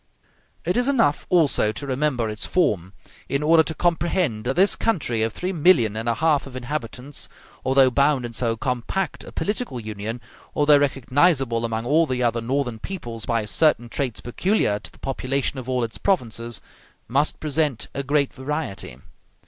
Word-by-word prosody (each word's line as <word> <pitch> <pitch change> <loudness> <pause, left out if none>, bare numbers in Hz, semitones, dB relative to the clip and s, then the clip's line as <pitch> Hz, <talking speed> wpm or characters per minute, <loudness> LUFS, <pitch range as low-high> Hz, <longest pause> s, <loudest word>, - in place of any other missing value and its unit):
It 180 +5 +1
is 245 +1 +2
enough 230 - +2
also 155 -11 +3
to 140 - -5
remember 130 -3 0
its 105 0 -3
form 100 - +1 0.4
in 140 +2 0
order 160 +1 +6
to 160 +1 -3
comprehend 170 - 0
that 130 - 0
this 190 +3 +4
country 145 - 0
of 110 0 +1
three 180 - -3
millions 145 - +4
and 115 +2 -2
a 115 - +1
half 150 -1 +2
of 130 - -11
inhabitants, 130 +1 -5 0.3
although 130 0 +4
bound 140 -1 +2
in 120 - -6
so 115 -1 -1
compact 130 +9 -2
a - - -10
political 205 - -2
union, 110 +1 -5 0.4
although 145 0 +5
recognizable 135 -2 +2
among 115 0 -2
all 155 +5 +3
the 125 -2 -1
other 115 -1 +1
northern 120 -1 -1
peoples 120 - -5
by 115 -3 0
certain 120 +1 +2
traits 125 -2 -2
peculiar 120 - 0
to - - -11
the - - -20
population 135 0 -2
of 130 0 -8
all 125 -1 +1
its 115 -1 -5
provinces, 115 - -1 0.5
must 140 +6 +1
present 150 -4 0
a 140 - -2
great 140 0 +1
variety. 130 - -4
135 Hz, 170 wpm, -23 LUFS, 115-155 Hz, 0.5 s, order